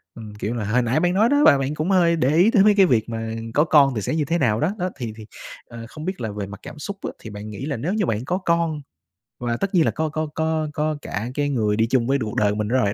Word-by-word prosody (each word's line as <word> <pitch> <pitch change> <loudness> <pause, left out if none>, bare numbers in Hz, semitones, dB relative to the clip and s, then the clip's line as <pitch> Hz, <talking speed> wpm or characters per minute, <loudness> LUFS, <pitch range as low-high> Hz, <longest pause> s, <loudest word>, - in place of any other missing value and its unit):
ừm, 110 -3 -10
kiểu 105 +2 -3
là 110 -3 -3
hồi 120 +4 +2
nãy 120 +5 +1
bạn 175 +1 +1
nói 215 +4 +3
đó, 285 +1 +3
và 140 - +7
bạn 135 +2 -2
cũng 155 +5 -1
hơi 170 -3 +4
để 135 -5 +1
ý 185 +7 +5
tới 200 -4 +5
mấy 210 0 +6
cái 195 - +7
việc 120 -8 +1
mà 115 -1 -4 0.2
có 150 - +4
con 140 -5 +4
thì 105 - -2
sẽ 100 - -2
như 155 -2 0
thế 165 +4 0
nào 115 -8 +1
đó. 165 +9 0
Đó, 180 +1 -1
thì 115 -4 -5
thì, 110 - -10 0.4
ờ, 115 -1 -10
không 155 +3 -9
biết 185 -6 -4
là 110 -2 -3
về 100 -1 -5
mặt 105 0 -10
cảm 150 - -10
xúc 200 +6 -6
á - - -3
thì 110 - -9
bạn 105 +1 -8
nghĩ 115 +6 -6
là 140 -5 -3
nếu 165 - -2
như 215 -2 0
bạn 115 -3 -2
có 175 +6 -1
con 170 -4 0 0.6
và 120 -1 -2
tất 195 +6 -3
nhiên 165 -3 +4
là - - +2
có 160 0 -2
có 155 +1 -3
có 160 -1 0
có 155 0 -1
cả 110 0 -4
cái 145 -1 0
người 110 -6 0
đi 110 +1 +1
chung 120 -1 +1
với 135 +1 +2
cuộc 110 -5 -4
đời 105 -1 +2
của - - -3
mình 105 0 -2
nữa 120 - 0
rồi, 100 -5 +1
140 Hz, 315 wpm, -22 LUFS, 115-165 Hz, 0.6 s, và